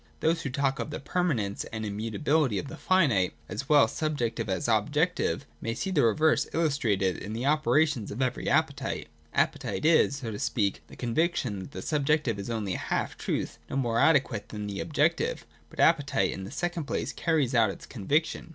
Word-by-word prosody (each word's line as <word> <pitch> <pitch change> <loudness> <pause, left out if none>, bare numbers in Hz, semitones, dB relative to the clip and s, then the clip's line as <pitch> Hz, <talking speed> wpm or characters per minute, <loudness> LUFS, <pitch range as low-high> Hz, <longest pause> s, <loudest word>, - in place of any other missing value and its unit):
Those 165 +1 +1
who 140 - -3
talk 135 +1 0
of - - -3
the 150 - -5
permanence 135 - -1
and 110 -1 -5
immutability 110 +5 0
of 140 - -4
the - - -7
finite, 135 - +2
as 140 - -5
well 150 -2 +6
subjective 120 -8 -2
as 95 +1 -1
objective, 130 - +1 0.2
may 115 0 -2
see 195 - -3
the 160 -6 +3
reverse 155 +8 +3
illustrated 115 - +1
in 105 - -6
the 115 +3 -3
opera 155 +1 +4
tions 130 -9 -4
of 105 - -6
every 130 -2 -1
appetite. - - 0 0.2
Appetite - - 0
is, 160 -3 +4
so 125 -5 -5
to 105 - -6
speak, 100 -4 0
the - - -13
conviction 125 - 0
that 95 - -8
the 95 - -6
subjective 145 -6 +1
is 100 - -5
only 110 -5 -2
a - - -3
halftruth, - - -2
no - - -4
more 120 -4 +1
adequate 135 -8 +2
than 105 -1 -5
the 100 -1 -4
objective. 165 - 0 0.2
But - - -15
appetite 140 -4 +3
in 95 - -6
the 95 - -8
second 175 -3 -2
place - - -2
carries 155 -6 +1
out 115 -4 +4
its - - -8
conviction. 150 - -1
135 Hz, 190 wpm, -28 LUFS, 110-155 Hz, 0.2 s, well